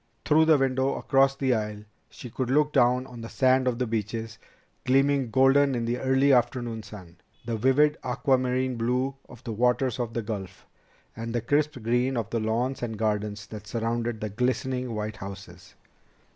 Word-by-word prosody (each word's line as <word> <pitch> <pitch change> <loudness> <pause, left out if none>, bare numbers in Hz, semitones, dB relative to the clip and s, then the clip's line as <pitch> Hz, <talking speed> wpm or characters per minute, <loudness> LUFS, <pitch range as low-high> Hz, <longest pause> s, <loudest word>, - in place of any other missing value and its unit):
Through 160 +1 +4
the 160 -1 +5
window 135 0 +1
across 135 0 +2
the 135 -2 +1
aisle, 105 -2 -3 0.3
she 125 - -10
could 130 0 -3
look 150 +2 +2
down 125 +1 +3
on 125 -3 -10
the 115 - -7
sand 130 0 +2
of 125 -2 0
the 125 - 0
beaches, 110 0 -4 0.4
gleaming 135 -1 +2
golden 135 +2 +4
in 120 -1 -2
the 120 +2 -1
early 135 +1 +3
afternoon 120 -2 0
sun, 95 -5 -12 0.3
the 115 -1 -2
vivid 140 +7 +3
aquamarine 130 0 0
blue 125 +4 0 0.2
of 125 - -14
the 115 - -4
waters 125 +2 +1
of 115 -2 -3
the 115 - -1
Gulf, 100 -4 -6 0.5
and 115 +1 -5
the 120 - 0
crisp 145 +3 0
green 125 +3 +1
of 115 -2 -3
the 115 - 0
lawns 115 +5 -1
and 115 -3 -4
gardens 105 -1 -2
that 105 -1 -10
surrounded 115 0 -2
the 110 - -3
glistening 125 +2 -2
white 105 0 -4
houses. 95 0 -10
120 Hz, 175 wpm, -26 LUFS, 110-130 Hz, 0.5 s, the